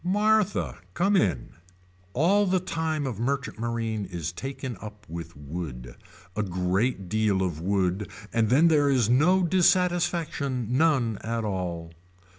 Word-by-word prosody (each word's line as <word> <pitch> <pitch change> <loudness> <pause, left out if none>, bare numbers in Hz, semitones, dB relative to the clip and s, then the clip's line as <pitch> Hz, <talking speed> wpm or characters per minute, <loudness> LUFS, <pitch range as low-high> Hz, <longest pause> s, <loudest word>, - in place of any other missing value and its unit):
Martha. 210 +2 +1 0.2
Come 195 +4 +2
in. 100 - +1 0.6
All 195 +9 +3
the 185 0 +2
time 160 -4 -2
of 120 -6 -4
merchant 130 -1 -2
marine 115 -2 -2
is 85 -3 -4
taken 130 +5 -5
up 105 -1 -10
with 85 -1 -8
wood. 70 -5 -7 0.4
A 105 - 0
great 95 +3 -1
deal 105 -1 +1
of 85 -4 -3
wood 95 +1 0 0.2
and 115 -2 +2
then 145 +7 +5
there 150 -3 +4
is 125 -5 +2
no 180 +9 +4
dissatisfaction 170 - +1
none 130 -8 +2
at 115 0 -2
all. 90 -4 -3
115 Hz, 135 wpm, -26 LUFS, -, 0.6 s, then